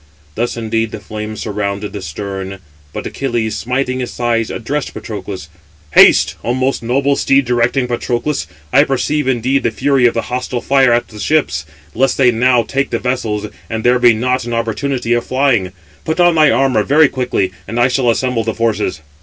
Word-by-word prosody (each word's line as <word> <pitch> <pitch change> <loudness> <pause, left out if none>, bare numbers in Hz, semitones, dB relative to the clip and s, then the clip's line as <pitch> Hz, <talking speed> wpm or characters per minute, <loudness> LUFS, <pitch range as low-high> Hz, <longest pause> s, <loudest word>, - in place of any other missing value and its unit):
Thus 120 +4 -2
indeed 115 0 -1
the - - -7
flame 110 0 -6
surrounded 100 -1 -3
the 100 - -5
stern; 95 +3 -6 0.3
but - - -6
Achilles, 120 -5 -2
smiting 130 +1 -2
his 125 - -5
thighs, 115 -2 0
addressed 140 +5 -4
Patroclus: 100 -5 -6 0.4
"Haste, - - +6
O 120 - 0
most 130 +1 0
noble 135 +4 +1
steed 135 0 +2
directing 125 +2 +1
Patroclus 120 - -2 0.3
(I 140 +3 +7
perceive, 145 +1 -1
indeed, 130 +2 +1
the - - +1
fury 130 +1 +2
of 115 - -1
the 115 - 0
hostile 125 0 -3
fire 135 -1 +3
at 120 0 +1
the 105 - -11
ships), 80 - 0 0.3
lest 135 +2 +1
they 125 -3 +5
now 120 +1 +3
take 135 +3 -2
the - - -1
vessels, 115 -5 -2 0.2
and 110 -1 -3
there 125 +1 +3
be 120 -1 +6
not 125 +3 0
an 120 0 -3
opportunity 120 +2 -1
of 120 - +1
flying; 130 -8 +1 0.3
put 160 - -2
on 175 -1 +5
thy 155 -2 +5
armour 135 -6 +2
very 150 +7 +4
quickly, 125 -8 -1 0.2
and 115 - -3
I 120 - +5
shall 125 -1 +1
assemble 120 0 0
the 110 -1 -3
forces." 110 -7 -1
120 Hz, 185 wpm, -16 LUFS, 110-135 Hz, 0.4 s, I